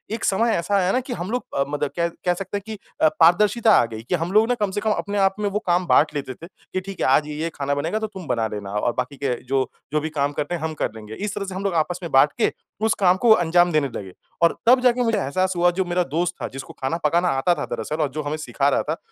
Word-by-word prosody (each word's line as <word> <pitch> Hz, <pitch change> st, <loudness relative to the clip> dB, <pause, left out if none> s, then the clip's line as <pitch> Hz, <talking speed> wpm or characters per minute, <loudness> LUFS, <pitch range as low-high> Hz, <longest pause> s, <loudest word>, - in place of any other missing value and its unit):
एक 225 Hz, -, -8 dB
समय 225 Hz, +4 st, +2 dB
ऐसा 170 Hz, +4 st, -1 dB
आया 185 Hz, -1 st, +2 dB
ना 255 Hz, -, +2 dB
कि 255 Hz, 0 st, -6 dB
हम 185 Hz, -1 st, -5 dB
लोग 250 Hz, +1 st, -2 dB
अ, 140 Hz, -, +3 dB
मतलब 145 Hz, -1 st, -1 dB
कह 170 Hz, -, +2 dB, 0.2 s
कह 180 Hz, -, +3 dB
सकते 195 Hz, +3 st, -4 dB
हैं 200 Hz, -, -7 dB
कि 220 Hz, -1 st, -6 dB, 0.2 s
अ, -, -, +7 dB
पारदर्शिता 210 Hz, +7 st, +5 dB
आ -, -, +1 dB
गई 110 Hz, -1 st, -8 dB
कि -, -, +2 dB
हम 165 Hz, +3 st, -3 dB
लोग 215 Hz, +2 st, +4 dB
ना 245 Hz, -, +2 dB
कम 200 Hz, -, +1 dB
से 205 Hz, -, -3 dB
कम 220 Hz, -, +1 dB
अपने 205 Hz, 0 st, -2 dB
आप 195 Hz, -1 st, +3 dB
में 205 Hz, -1 st, 0 dB
वो 205 Hz, -, -1 dB
काम 175 Hz, +1 st, +2 dB
बाँट 150 Hz, 0 st, +4 dB
लेते 135 Hz, -2 st, -3 dB
थे 165 Hz, +6 st, -12 dB
कि 185 Hz, 0 st, -7 dB
ठीक 195 Hz, 0 st, -9 dB
है -, -, +2 dB
आज 140 Hz, +3 st, +3 dB
ये-ये 155 Hz, +2 st, -3 dB
खाना 140 Hz, 0 st, -1 dB
बनेगा 165 Hz, +9 st, -1 dB
तो 220 Hz, -, -2 dB
तुम 190 Hz, -6 st, -10 dB
बना 115 Hz, -4 st, 0 dB
लेना। 100 Hz, -1 st, -6 dB
और 105 Hz, +3 st, 0 dB
बाकी 125 Hz, +2 st, -3 dB
के 135 Hz, -3 st, -1 dB
जो 130 Hz, +1 st, 0 dB, 0.2 s
जो 150 Hz, -, +3 dB
भी 160 Hz, -, -3 dB
काम 145 Hz, -2 st, -1 dB
करने 150 Hz, +4 st, -1 dB
हैं 160 Hz, -, -6 dB
हम 160 Hz, 0 st, -2 dB
कर -, -, -1 dB
लेंगे। 110 Hz, -1 st, -9 dB
इस 205 Hz, -, -4 dB
तरह 200 Hz, -, -3 dB
से 190 Hz, -1 st, -6 dB
हम 190 Hz, -, -4 dB
लोग 195 Hz, -3 st, 0 dB
आपस 175 Hz, +3 st, 0 dB
में 170 Hz, -, -5 dB
बाँट 135 Hz, +2 st, +5 dB
के -, -, +3 dB, 0.3 s
उस 225 Hz, -, +3 dB
काम 185 Hz, -1 st, +4 dB
को 235 Hz, +3 st, +2 dB
अंजाम 175 Hz, -2 st, +3 dB
देने 155 Hz, -3 st, +2 dB
लगे। 95 Hz, -2 st, -7 dB, 0.3 s
और 170 Hz, -, +4 dB
तब 250 Hz, +2 st, +6 dB
जाके 250 Hz, 0 st, +3 dB
मुझे 225 Hz, -2 st, +1 dB
एहसास 185 Hz, +4 st, 0 dB
हुआ 175 Hz, 0 st, +4 dB
जो 190 Hz, -, +1 dB
मेरा 175 Hz, +1 st, +1 dB
दोस्त 175 Hz, +2 st, 0 dB
था -, -, -2 dB
जिसको 135 Hz, 0 st, -8 dB
खाना 135 Hz, +5 st, -1 dB
पकाना 170 Hz, +4 st, +2 dB
आता 175 Hz, +6 st, +3 dB
था 145 Hz, -, -3 dB
दरअसल 120 Hz, +7 st, -4 dB
और 150 Hz, -, +1 dB
जो -, -, 0 dB
हमें 145 Hz, +1 st, -2 dB
सिखा 140 Hz, -2 st, 0 dB
रहा -, -, +1 dB
था 160 Hz, -, -1 dB
175 Hz, 295 wpm, -22 LUFS, 145-200 Hz, 0.3 s, अ